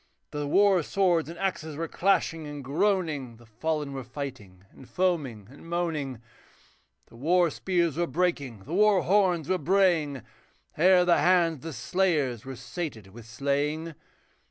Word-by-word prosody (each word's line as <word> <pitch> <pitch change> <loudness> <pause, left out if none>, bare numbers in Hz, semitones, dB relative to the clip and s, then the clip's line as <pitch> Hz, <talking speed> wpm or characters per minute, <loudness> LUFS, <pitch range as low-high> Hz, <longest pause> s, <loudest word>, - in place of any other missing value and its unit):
The 145 -1 -3
war 195 +3 +4
swords 175 -2 +1
and 170 - -8
axes 160 -5 -3
were 165 +2 -3
clashing 165 -4 0
and 145 -1 -7
groaning, 150 - -1
The 120 - -18
fallen 145 +6 -3
were 135 -1 -5
fighting 115 -8 -8
and 130 - -16
foaming 140 - -1
and 145 +4 -14
moaning; 155 -9 -2 0.8
The - - -19
war 170 +6 +2
spears 170 -4 0
were 175 0 +1
breaking, 140 - -1
the 150 - -8
war 205 0 +4
horns 180 -5 +2
were 185 -1 +1
braying, 160 - +2 0.5
Ere 180 +2 +5
the 175 - +4
hands 175 -3 +3
of - - -17
the 165 0 -6
slayers 140 - 0
were 135 0 -6
sated 125 - -6
with 115 +3 -13
slaying. 145 +6 -2
155 Hz, 155 wpm, -27 LUFS, 135-180 Hz, 0.8 s, Ere